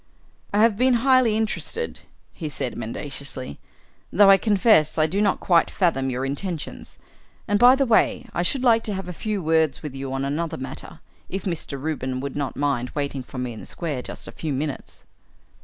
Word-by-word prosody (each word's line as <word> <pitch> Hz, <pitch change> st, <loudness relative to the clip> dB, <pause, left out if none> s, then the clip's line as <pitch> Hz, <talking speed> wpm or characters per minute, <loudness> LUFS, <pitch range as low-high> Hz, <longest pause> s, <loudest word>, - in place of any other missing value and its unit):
"I 205 Hz, -, +2 dB
have 225 Hz, -3 st, +4 dB
been 255 Hz, +1 st, +4 dB
highly 255 Hz, -5 st, +4 dB
interested," 225 Hz, -, -3 dB, 0.3 s
he 155 Hz, -4 st, -5 dB
said 135 Hz, -4 st, -4 dB
mendaciously, 130 Hz, -, -5 dB, 0.5 s
"though 195 Hz, 0 st, +7 dB
I 195 Hz, -, +8 dB
confess 205 Hz, -8 st, +3 dB
I 155 Hz, -, +4 dB
do 190 Hz, +6 st, -1 dB
not 200 Hz, -2 st, +2 dB
quite 170 Hz, -2 st, +3 dB
fathom 145 Hz, -8 st, +1 dB
your 130 Hz, +1 st, -2 dB
intentions. 155 Hz, +3 st, -5 dB, 0.5 s
And, 205 Hz, 0 st, +2 dB
by 245 Hz, +3 st, +8 dB
the 275 Hz, 0 st, +1 dB
way, 240 Hz, +2 st, +2 dB
I -, -, 0 dB
should 255 Hz, +9 st, +1 dB
like 230 Hz, -3 st, +4 dB
to 210 Hz, -, -1 dB
have 190 Hz, -1 st, -5 dB
a 180 Hz, -, -5 dB
few 205 Hz, +1 st, -3 dB
words 160 Hz, -2 st, +1 dB
with 150 Hz, -3 st, -5 dB
you 135 Hz, 0 st, -5 dB
on 135 Hz, +1 st, -2 dB
another 155 Hz, +4 st, -2 dB
matter, 130 Hz, -, -8 dB, 0.3 s
if 195 Hz, -, -4 dB
Mr. 160 Hz, -6 st, -4 dB
Reuben 130 Hz, -3 st, -3 dB
would 140 Hz, +1 st, -5 dB
not 140 Hz, -2 st, -3 dB
mind 135 Hz, -4 st, 0 dB
waiting 140 Hz, -2 st, -2 dB
for 130 Hz, -, -11 dB
me 125 Hz, -1 st, -3 dB
in 110 Hz, -, -9 dB
the -, -, -10 dB
square 150 Hz, -7 st, -4 dB
just -, -, -8 dB
a -, -, -7 dB
few 155 Hz, -, -4 dB
minutes." 140 Hz, +1 st, -5 dB
160 Hz, 195 wpm, -24 LUFS, 135-205 Hz, 0.5 s, I